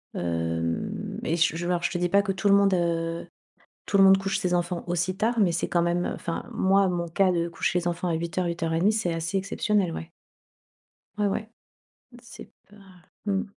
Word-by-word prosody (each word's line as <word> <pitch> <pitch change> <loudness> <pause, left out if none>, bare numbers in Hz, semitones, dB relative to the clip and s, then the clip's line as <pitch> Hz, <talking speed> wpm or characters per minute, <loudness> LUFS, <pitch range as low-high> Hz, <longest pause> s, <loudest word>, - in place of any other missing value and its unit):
hem, 85 -1 -2
et 165 - 0
j 160 0 +2
je 175 - -4
alors 175 -1 0
je - - 0
te 175 - -2
dis 175 0 0
pas 200 +2 +4
que 195 - -1
tout 200 +2 0
le 200 - +7
monde, 200 -1 +4
heu, 170 -1 -1 0.6
tout - - +1
le 195 - +8
monde 195 0 +7
couche 195 0 -1
ses 180 -2 -1
enfants 175 0 -1
aussi 175 +2 -1
tard 230 +3 0
mais 185 -4 +3
c'est 170 - -1
quand 175 - +2
même 175 +1 0
heu, - - -2
enfin, 165 - -4
moi 195 -2 +3
mon 175 -1 -2
cas 185 +2 +2
de 170 -1 0
coucher 170 +1 -1
les 175 - -2
enfants 175 +1 -2
à 170 - 0
20:00-20:30 170 +2 0
c'est 195 -6 -1
assez 165 +4 -1
exceptionnel, 195 -2 0
ouais. 165 - -7 1.1
Ouais, 210 - +2
ouais, 215 +2 -3 0.7
c'est 235 - -12 0.2
pas, 205 - -18 0.5
mmh 200 +1 0
175 Hz, 205 wpm, -26 LUFS, 170-195 Hz, 1.1 s, le